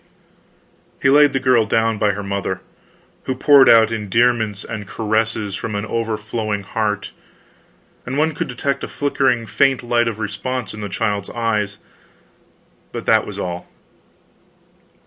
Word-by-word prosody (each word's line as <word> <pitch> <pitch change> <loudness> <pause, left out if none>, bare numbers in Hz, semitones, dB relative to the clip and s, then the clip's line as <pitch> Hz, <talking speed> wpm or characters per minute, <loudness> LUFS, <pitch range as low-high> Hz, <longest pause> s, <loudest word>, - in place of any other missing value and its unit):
He 135 - +3
laid 145 0 +6
the 135 - 0
girl 125 -4 +3
down 110 0 +1
by 105 -1 +2
her 100 +1 -5
mother, 100 -2 -3 0.6
who 130 - -2
poured 140 +1 +6
out 115 -1 +6
endearments 110 0 +1
and 105 -4 -6
caresses 110 -1 -1
from 105 +2 -4
an 100 +1 -2
overflowing 110 -2 -3
heart, 105 -1 -2 0.9
and 130 +2 -4
one 155 +1 +2
could 170 - -3
detect 135 +2 -2
a - - -3
flickering 130 -4 0
faint 135 +4 +2
light 120 0 +1
of 115 -2 -2
response 110 +4 -4
in 105 - -8
the 105 - -4
child's 100 0 -2
eyes, 105 -3 -1 1.1
but - - -6
that - - +3
was - - -7
all. 90 0 -4
110 Hz, 145 wpm, -20 LUFS, 105-125 Hz, 1.1 s, laid